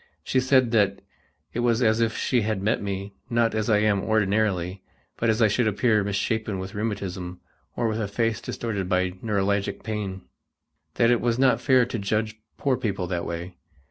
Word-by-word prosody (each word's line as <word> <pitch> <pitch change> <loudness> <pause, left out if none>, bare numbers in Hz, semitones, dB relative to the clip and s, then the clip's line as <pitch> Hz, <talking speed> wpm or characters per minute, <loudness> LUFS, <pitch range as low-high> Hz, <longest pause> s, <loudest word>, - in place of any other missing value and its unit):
She 130 - +1
said 130 -2 +3
that 100 -4 +2 0.5
it - - -2
was 120 0 +2
as 110 0 +3
if 115 -1 +1
she 125 -3 +1
had 105 -2 -1
met 110 +3 +1
me, 100 0 -4 0.2
not 115 -1 +2
as 110 +1 -1
I 105 - +5
am 105 -2 +2
ordinarily, 100 -4 0 0.3
but 115 - 0
as 110 +1 +3
I - - +6
should 110 +2 +1
appear 105 0 +2
misshapen 100 +1 -1
with 95 +2 -6
rheumatism 95 -4 -4 0.4
or 115 - 0
with 110 0 -1
a 105 - -1
face 115 +2 -1
distorted 100 -6 -3
by 90 -1 +1
neuralgic 100 -2 -1
pain; 100 -4 -4 0.7
that 115 +1 +4
it 120 - +2
was 120 0 +1
not 130 0 +3
fair 130 -3 +4
to 115 -1 -4
judge 110 +2 -1 0.2
poor 135 -3 +1
people 100 -7 -2
that 85 -1 -2
way. 85 +1 -6
110 Hz, 185 wpm, -25 LUFS, 100-115 Hz, 0.7 s, I